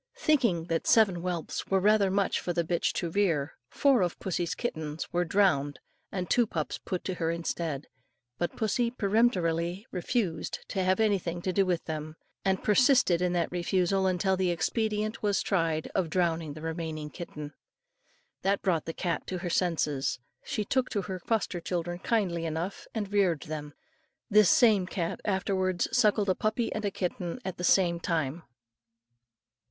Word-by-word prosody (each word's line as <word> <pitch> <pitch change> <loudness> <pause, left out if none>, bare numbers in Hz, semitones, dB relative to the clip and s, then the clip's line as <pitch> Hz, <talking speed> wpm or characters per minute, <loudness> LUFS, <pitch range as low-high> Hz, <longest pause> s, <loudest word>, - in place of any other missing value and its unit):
Thinking 250 - +2
that 165 -1 -2
seven 210 -6 +5
whelps 175 -1 -3
were 195 - +2
rather 205 0 +4
many 195 0 +1
for 175 - -1
the 170 - +1
bitch 170 +1 0
to 170 - -2
rear, 165 -7 +1 0.2
four 275 -6 +3
of 175 -2 0
pussy's 175 -2 -2
kittens 160 -10 -4
were 175 0 +2
drowned 160 -6 +2 0.3
and 180 -2 -3
two 240 +4 +3
pups 155 -6 -3
put 185 - -4
to 190 - -2
her 165 -2 -1
instead. 165 -3 -3 0.5
But 175 - -1
pussy 230 +2 +1
peremptorily 195 -5 +1
refused 180 -2 -2
to 190 - -1
have 185 +2 +2
anything 195 -6 +1
to 185 - 0
say 195 - +2
to 185 -2 +2
them, 155 0 -5 0.3
and 190 -1 0
persisted 245 - +4
in 180 -1 +1
that 170 -2 0
refusal 185 +2 +1
until 190 +1 +1
the 185 -1 +1
expedient 215 +5 -1
was 205 -2 +1
tried 165 -5 0
of 175 -4 0
drowning 165 -3 0
the 155 +1 -10
remaining 160 -2 -4
kitten. 150 -3 -7 0.9
That 195 +1 +1
brought 170 -5 +1
the 165 - -4
cat 170 -3 -2
to 185 - -3
her 175 -1 -4
senses; 155 -8 0 0.2
and - - -15
she 210 - -1
took 255 +4 +1
to 200 -3 -1
her 185 0 -5
foster 205 -2 -1
children 175 0 -3
kindly 180 -7 0
enough 165 +5 -4
and 205 -2 -3
reared 185 -7 +2
them. 150 -2 -6 0.6
This 210 -3 +6
same 210 -6 +5
cat 170 -3 -3
afterwards 190 -2 0
suckled 210 -4 +3
a - - +5
puppy 220 +5 -1
and 210 -2 -2
kitten 180 +3 -3
at 190 -1 -4
the 180 - -5
same 175 -2 +3
time. 165 -2 -1
180 Hz, 170 wpm, -29 LUFS, 165-200 Hz, 0.9 s, This